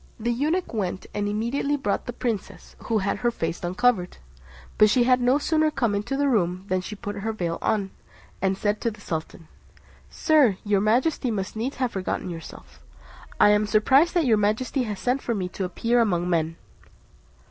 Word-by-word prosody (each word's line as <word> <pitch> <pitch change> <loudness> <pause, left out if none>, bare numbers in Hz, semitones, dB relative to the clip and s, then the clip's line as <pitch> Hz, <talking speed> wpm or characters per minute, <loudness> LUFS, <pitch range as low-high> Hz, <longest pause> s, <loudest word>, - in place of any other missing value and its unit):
The 235 +2 0
eunuch 305 +9 -1
went, 190 -4 -3
and 205 0 -1
immediately 240 +7 -1
brought 205 -7 -2
the - - -2
princess, 230 -4 -5
who 225 - +1
had 200 -1 -1
her 240 - +1
face 170 -7 -4
uncovered; 185 +1 +1 0.6
but 215 0 +7
she 245 +3 +4
had 250 0 +3
no 250 +3 +4
sooner 310 +1 +2
come 235 -8 0
into 210 +7 -2
the 285 0 +2
room, 185 -6 0
than 185 0 +1
she 210 +3 -7
put 205 0 -6
on - - -5
her 225 +2 -1
veil, 175 -6 -3 0.8
and 190 0 +1
said 210 +1 -1
to 230 - +1
the 215 -1 -11
sultan, 160 -3 -6 0.6
"Sir, 285 - +3
your 205 -2 +2
majesty 250 +6 +1
must 195 -3 -3
needs 240 +5 -3
have 255 -3 -1
forgotten 185 -1 -3
yourself; 65 - -11 0.6
I - - +7
am 210 0 +3
surprised 265 - +4
that 340 -3 +3
your 225 -4 +4
majesty 225 +5 0
has 210 -3 -5
sent 255 +2 0
for 235 - -2
me 185 -3 -2
to 190 - -4
appear 230 +6 +1
among 180 -6 +1
men." 165 -2 0
215 Hz, 190 wpm, -25 LUFS, 190-250 Hz, 0.8 s, but